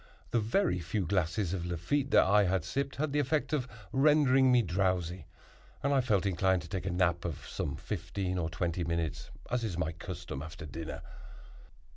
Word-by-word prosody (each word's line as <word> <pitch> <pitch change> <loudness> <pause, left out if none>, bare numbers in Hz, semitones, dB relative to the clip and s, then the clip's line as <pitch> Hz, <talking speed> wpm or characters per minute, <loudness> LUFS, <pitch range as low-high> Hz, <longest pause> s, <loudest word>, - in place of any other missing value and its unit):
The 120 - +3
very 115 - +1
few 90 +3 -2
glasses 95 +1 0
of 90 -3 -2
Lafitte 90 - -1
that - - +6
I 100 +1 +4
had 90 -3 0
sipped 135 +10 -2
had 150 +1 -1
the 150 - +2
effect 145 +2 0
of 130 -4 0 0.2
rendering 135 -1 +5
me 125 -1 +5
drowsy, 90 -2 -1 0.6
and 140 +1 +2
I 135 - +4
felt 105 -6 +1
inclined 95 -1 +2
to - - -9
take 95 +2 -4
a - - 0
nap 90 -1 +1
of 85 -4 -5
some 70 - -3
fifteen 95 -2 -3
or 80 -2 -1
twenty 85 +1 -1
minutes, 85 -2 -2 0.2
as 125 -1 0
is 100 -7 -2
my 80 -3 0
custom 80 -4 -6
after 80 0 -8
dinner. 80 +2 -6
95 Hz, 185 wpm, -31 LUFS, 85-125 Hz, 0.6 s, that